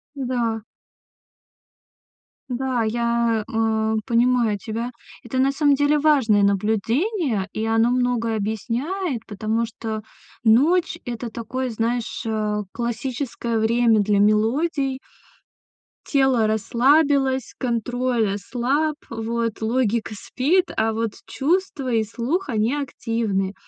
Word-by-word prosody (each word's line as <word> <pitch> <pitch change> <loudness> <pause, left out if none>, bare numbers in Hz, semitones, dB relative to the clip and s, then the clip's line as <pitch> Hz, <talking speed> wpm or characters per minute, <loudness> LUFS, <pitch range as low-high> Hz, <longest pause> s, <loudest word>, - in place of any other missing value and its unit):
Да. 240 -4 -1 1.9
Да, 250 -1 -1
я, 235 0 +1
а, 220 -1 0
понимаю 240 -3 +2
тебя, 230 +3 -4 0.3
это, 240 +2 -4
на 270 +1 +3
самом 285 -1 +3
деле, 290 +2 +3
важное 265 -9 +4
наблюдение, 220 - 0
и 220 - -2
оно 225 +1 +3
многое 245 -2 +1
объясняет, 235 - -2
потому 220 +2 -1
что 220 -1 -5 0.4
ночь- 295 +11 +3
это 240 0 -4
такое, 245 +3 -4
знаешь, 230 +1 -2
а, 210 -1 -1
классическое 235 0 -3
время 230 0 +3
для 205 0 +2
мелодий. 260 +7 +2 1.1
Тело 265 -6 +3
расслабилось, 265 +4 +2
контроль 240 -2 0
ослаб, 265 +9 -1
вот 230 0 -3
логика 230 -1 0
спит, 335 - +1
а 220 0 +1
вот 225 0 -1
чувства 275 +1 -1
и 225 -1 +3
слух 250 - -2
они 225 +3 +1
активны, 225 -8 -2
235 Hz, 105 wpm, -22 LUFS, 220-265 Hz, 1.9 s, важное